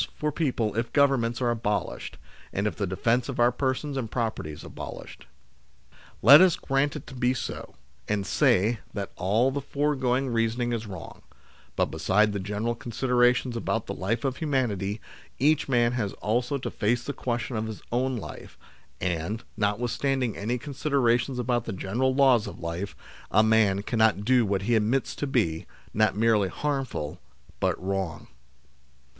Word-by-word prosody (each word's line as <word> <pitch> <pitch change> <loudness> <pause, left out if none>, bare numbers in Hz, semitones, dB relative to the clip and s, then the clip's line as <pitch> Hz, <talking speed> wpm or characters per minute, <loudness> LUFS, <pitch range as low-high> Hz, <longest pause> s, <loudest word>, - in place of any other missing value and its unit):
123 - - -10
for 150 0 0
people 125 -9 -1
if 115 +1 -1
Governments 130 -4 +2
are 120 - +2
abolished, 105 -3 -2 0.3
and 100 - -1
if 105 - -1
the 100 - -2
defence 115 +7 0
of 130 - -4
our 120 +1 +5
persons 135 +3 -2
and 125 -5 -3
property 110 -10 -2
is 75 - -10
abolished. - - -9 1.0
Let 140 - +10
us 185 -3 +5
grant 140 +2 0
it 150 - -7
to - - -11
be 125 0 +1
so, - - -6 0.3
and 100 -2 -1
say 105 +6 +3 0.2
that 100 -2 -4
all 110 +8 +2
the 140 +1 -2
foregoing 135 -2 0
reasoning 115 +1 0
is 115 -1 -3
wrong; 95 -5 -9 0.5
but - - +1
besides 100 +6 +2
the 100 - -3
general 105 +4 -2
considerations 125 +1 +1
about 115 -1 -1
the 100 - -4
life 105 +8 -2
of 130 -1 -1
humanity, 110 - -1 0.4
each 150 +2 +2
man 120 -2 +3
has 110 -5 -2
also 120 +6 -1
to 130 - -5
face 120 +3 0
the 140 - -4
question 120 -1 -3
of 110 0 -2
his 110 - -7
own 130 +1 0
life, 110 - -9 0.4
and, 90 +5 -2
notwithstanding 120 +4 0
any 115 +5 -2
considerations 135 -2 0
about 120 -1 0
the 110 - -4
general 120 +8 0
laws 130 -5 +4
of - - -8
life, 85 +4 -4 0.3
a 110 - +4
man 110 -3 +3
cannot 110 -2 +2
do 125 -2 +4
what 95 -1 0
he 120 +4 +1
admits 115 +5 +1
to 145 - -3
be, 100 - 0 0.3
not 110 -2 +2
merely 110 -3 +3
harmful, 125 - -3 0.4
but - - 0
wrong. 95 -3 -3
120 Hz, 165 wpm, -27 LUFS, 105-130 Hz, 1.0 s, Let